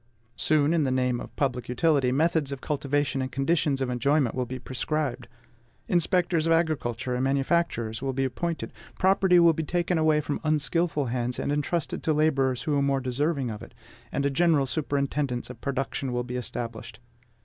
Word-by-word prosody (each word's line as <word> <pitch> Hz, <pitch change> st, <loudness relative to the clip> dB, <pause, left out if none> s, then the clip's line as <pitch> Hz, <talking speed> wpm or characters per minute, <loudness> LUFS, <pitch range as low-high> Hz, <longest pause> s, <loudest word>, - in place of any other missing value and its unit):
Soon, 155 Hz, +3 st, +2 dB
in 165 Hz, -3 st, +2 dB
the 135 Hz, -, +1 dB
name 125 Hz, -1 st, +1 dB
of -, -, -10 dB
public 125 Hz, -4 st, -1 dB
utility, 135 Hz, 0 st, +2 dB
methods 155 Hz, 0 st, +1 dB
of 140 Hz, -, -4 dB
cultivation 145 Hz, -1 st, -1 dB
and 130 Hz, -, -3 dB
conditions 135 Hz, +1 st, +1 dB
of 130 Hz, -1 st, -1 dB
enjoyment 135 Hz, +1 st, +1 dB
will 125 Hz, -1 st, -2 dB
be 130 Hz, -, -5 dB
prescribed; 130 Hz, 0 st, -3 dB, 0.6 s
inspectors 175 Hz, -1 st, +2 dB
of -, -, +2 dB
agriculture 130 Hz, -7 st, 0 dB
and 125 Hz, +1 st, -1 dB
manufactures 135 Hz, -5 st, 0 dB
will 135 Hz, 0 st, -1 dB
be 135 Hz, +1 st, -1 dB
appointed; 165 Hz, +6 st, -3 dB, 0.2 s
property 190 Hz, -1 st, +4 dB
will 170 Hz, -1 st, +6 dB
be 160 Hz, -, -2 dB
taken 175 Hz, +1 st, 0 dB
away 155 Hz, -1 st, +3 dB
from 150 Hz, -1 st, -3 dB
unskilful 155 Hz, -2 st, +1 dB
hands, 125 Hz, 0 st, -1 dB
and -, -, -2 dB
entrusted 150 Hz, +2 st, -1 dB
to 160 Hz, -, +1 dB
laborers 135 Hz, -4 st, +1 dB
who 150 Hz, -, 0 dB
are 140 Hz, -, +2 dB
more 140 Hz, -1 st, +1 dB
deserving 135 Hz, 0 st, -1 dB
of 105 Hz, -, -7 dB
it; -, -, -12 dB, 0.4 s
and 140 Hz, -, -1 dB
a 140 Hz, -, +2 dB
general 155 Hz, -1 st, +3 dB
superintendence 140 Hz, -3 st, -2 dB
of 115 Hz, -, -13 dB
production 135 Hz, -1 st, -2 dB
will 125 Hz, 0 st, -1 dB
be 125 Hz, 0 st, -6 dB
established. 120 Hz, -2 st, -5 dB
140 Hz, 180 wpm, -26 LUFS, 125-155 Hz, 0.6 s, will